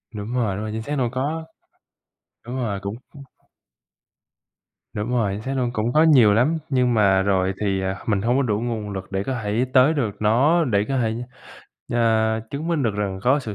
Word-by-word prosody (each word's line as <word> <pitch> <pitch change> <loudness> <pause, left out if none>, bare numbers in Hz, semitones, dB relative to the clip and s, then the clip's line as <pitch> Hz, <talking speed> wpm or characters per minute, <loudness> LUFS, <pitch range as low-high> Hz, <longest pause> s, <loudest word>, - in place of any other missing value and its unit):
Đúng 105 +4 -5
rồi, 110 -6 0
đúng 105 - -4
rồi, 110 - -4
chính 110 +1 -4
xác 145 +6 -4
đâu 125 -3 0
có 150 +5 -3 1.0
đúng 125 +2 -5
rồi 105 -6 -2
cũng 100 +3 -4 2.0
Đúng 105 +3 -3
rồi, 115 -5 +1
chính 105 - -5
xác 135 +4 -4
luôn 125 -2 0
cũng 115 +2 -1
có 155 +1 +5
nhiều 125 -10 +6
lắm, 140 +9 +2
nhưng 125 -3 +2
mà 95 -3 +4
rồi 95 -1 +1
thì, 95 -2 0
à, 95 0 -2
mình 100 -3 +1
hông 120 +3 +1
có - - +3
đủ 105 -3 0
nguồn 115 -3 -3
lực 95 -1 -7
để 95 0 -1
có 130 - -3
thể 110 +5 0
tới 130 +5 +5
được 110 -9 -2
nó, 140 +11 +3
để 105 -4 +1
có 135 -1 -1
thể, 110 -2 0 0.8
ờ, 110 -1 +2
chứng 150 +4 -4
minh 165 -5 0
được 110 -4 0
rằng 100 -2 -2
có 130 +4 +3
sự 110 -7 -6
115 Hz, 210 wpm, -22 LUFS, 105-130 Hz, 2.0 s, nhiều